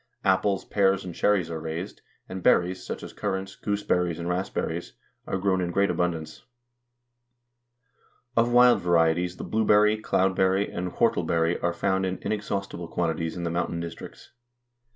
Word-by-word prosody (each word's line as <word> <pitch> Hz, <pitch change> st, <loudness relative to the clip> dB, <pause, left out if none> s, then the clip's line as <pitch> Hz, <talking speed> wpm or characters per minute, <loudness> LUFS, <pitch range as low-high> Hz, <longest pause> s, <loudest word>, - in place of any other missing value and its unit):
Apples, 95 Hz, +1 st, +2 dB
pears, 95 Hz, -2 st, +2 dB
and 90 Hz, -, -6 dB
cherries 100 Hz, -1 st, +1 dB
are 80 Hz, -, -4 dB
raised, 80 Hz, +5 st, -6 dB, 0.3 s
and 95 Hz, 0 st, -6 dB
berries, 90 Hz, +1 st, +2 dB
such -, -, -6 dB
as -, -, -9 dB
currants, 95 Hz, 0 st, -3 dB
gooseberries, 90 Hz, -5 st, -1 dB
and 85 Hz, 0 st, -5 dB
raspberries, 90 Hz, -1 st, -3 dB, 0.3 s
are -, -, -1 dB
grown 95 Hz, -1 st, +1 dB
in 90 Hz, -, -1 dB
great 100 Hz, +3 st, +2 dB
abundance. 85 Hz, -3 st, -2 dB, 1.9 s
Of 115 Hz, +1 st, +3 dB
wild 125 Hz, 0 st, +6 dB
varieties 85 Hz, +1 st, +2 dB
the -, -, -6 dB
blueberry, 105 Hz, 0 st, +3 dB
cloudberry, 95 Hz, 0 st, +2 dB
and 90 Hz, 0 st, -4 dB
whortleberry 85 Hz, 0 st, +1 dB
are 85 Hz, -, +1 dB
found 95 Hz, +2 st, 0 dB
in 95 Hz, 0 st, -3 dB
inexhaustible 100 Hz, -4 st, -3 dB
quantities 80 Hz, -1 st, -2 dB
in 85 Hz, -, -4 dB
the 85 Hz, -, -2 dB
mountain 85 Hz, 0 st, -2 dB
districts. 85 Hz, -1 st, -9 dB
90 Hz, 145 wpm, -26 LUFS, 85-100 Hz, 1.9 s, wild